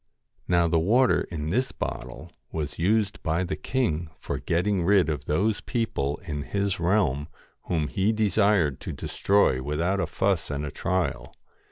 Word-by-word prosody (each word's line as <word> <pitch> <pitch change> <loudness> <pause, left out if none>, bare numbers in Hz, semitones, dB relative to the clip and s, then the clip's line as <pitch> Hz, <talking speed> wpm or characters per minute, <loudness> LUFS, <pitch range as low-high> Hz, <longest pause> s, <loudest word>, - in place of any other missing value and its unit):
Now 85 -1 +3
the 80 0 +2
water 120 +10 +3
in 80 -2 -3
this 125 +6 +1
bottle - - -6 0.2
was 75 -1 -4
used 105 +3 +1
by 80 +3 0
the 90 - -2
king 90 -11 -1
for - - -4
getting 90 +2 0
rid 95 -3 +4
of 75 -4 -3
those 100 +7 +1
people 105 - -2
in 75 -4 -3
his 100 +4 -1
realm 85 -6 +1 0.4
whom 80 -4 0
he 100 +5 +1
desired 100 -8 +2
to - - -5
destroy 100 -10 +2
without 80 +8 0
a - - 0
fuss 95 -3 0
and 75 0 -3
a 75 - -5
trial. 90 -4 -2
90 Hz, 160 wpm, -26 LUFS, 75-100 Hz, 0.4 s, rid